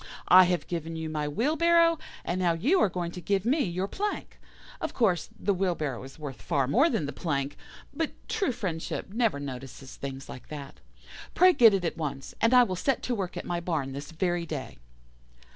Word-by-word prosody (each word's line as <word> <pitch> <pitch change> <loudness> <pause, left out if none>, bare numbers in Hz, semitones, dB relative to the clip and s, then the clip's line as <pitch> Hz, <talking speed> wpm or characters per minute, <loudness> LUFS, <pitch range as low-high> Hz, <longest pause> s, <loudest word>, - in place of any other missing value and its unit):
I 185 0 +9
have 180 -1 0
given 165 -1 -4
you 160 -1 -4
my 150 -1 -2
wheelbarrow, 330 - +3 0.3
and 175 +2 -1
now 175 -2 +3
you 280 - +2
are - - +4
going 175 -1 -3
to 180 - -8
give 195 +2 0
me 280 +5 +3
your 185 +1 -2
plank. 415 - -4 0.4
Of - - -3
course, 190 - +1
the 200 - +1
wheelbarrow 170 -9 -1
is 135 +3 -11
worth 145 -4 -7
far 140 -6 0
more 270 - +4
than 220 - 0
the 145 - -5
plank, 140 -3 -2 0.4
but 320 +2 -1 0.2
true, 430 - 0
friendship 190 -4 -4
never 225 -10 +1
notices 135 -1 -8
things 135 0 -6
like 125 - -10
that. 145 -2 -8 0.6
Pray 365 +1 +7
get 225 - +7
it 185 -2 -1
at 165 - -2
once, 140 -4 -4
and 230 - +4
I 250 -1 +8
will 185 -6 -2
set 270 +8 0
to 250 - -1
work 195 -6 -3
at - - -5
my 175 -1 -1
barn 160 -6 -2
this 140 +2 -7
very 175 +1 -1
day. 140 - -6
175 Hz, 200 wpm, -28 LUFS, 150-230 Hz, 0.6 s, I